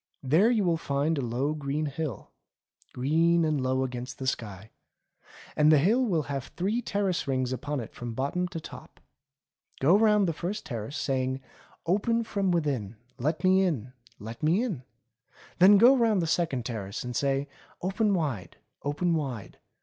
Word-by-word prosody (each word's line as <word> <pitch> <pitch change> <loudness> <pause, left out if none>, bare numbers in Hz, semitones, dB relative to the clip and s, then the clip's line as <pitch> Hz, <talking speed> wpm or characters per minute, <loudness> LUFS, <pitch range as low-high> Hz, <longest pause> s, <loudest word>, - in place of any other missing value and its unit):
There 160 - +4
you 225 -4 +2
will 170 -2 +2
find 145 +1 0
a 140 - -1
low 125 +5 -1
green 150 0 -2
hill; 145 -5 -5 0.6
green 165 +6 +2
and 155 -3 0
low 130 +1 +1
against 125 -1 -5
the 130 - -5
sky. 110 -5 -4 0.8
And 150 +1 +5
the 155 - +7
hill 215 - +3
will 175 -10 +1
have 135 -2 -4
three 205 +7 0
terrace 200 -7 -1
rings 130 -1 0
upon 145 +3 -3
it 115 - -7
from 120 -2 -6
bot 135 +3 -2
tom 180 0 0
to 175 -2 -6
top. - - -12 0.8
Go 155 +8 +5
round 210 -2 +4
the 165 - 0
first 190 +7 -4
terrace 120 +3 -5
saying: 130 -1 -1 0.5
*Open 220 +6 +1
from 200 -3 -1
within; 140 - -1 0.2
Let 155 +7 -1
me 185 +1 +5
in! 130 - -1 0.2
Let 115 +3 -9
me 170 +9 +2
in 195 - -3 0.4
!* - - -26
Then 195 +3 +8
go 245 +6 +7
round 225 -5 +3
the 170 - 0
second 155 -7 0
terrace 100 -5 -5
and 125 -1 -5
say: 140 +1 0 0.4
'Open 200 +2 +1
wide, 120 - -3 0.3
open 160 +5 0
wide. 135 -10 -4
150 Hz, 170 wpm, -28 LUFS, 130-185 Hz, 0.8 s, Then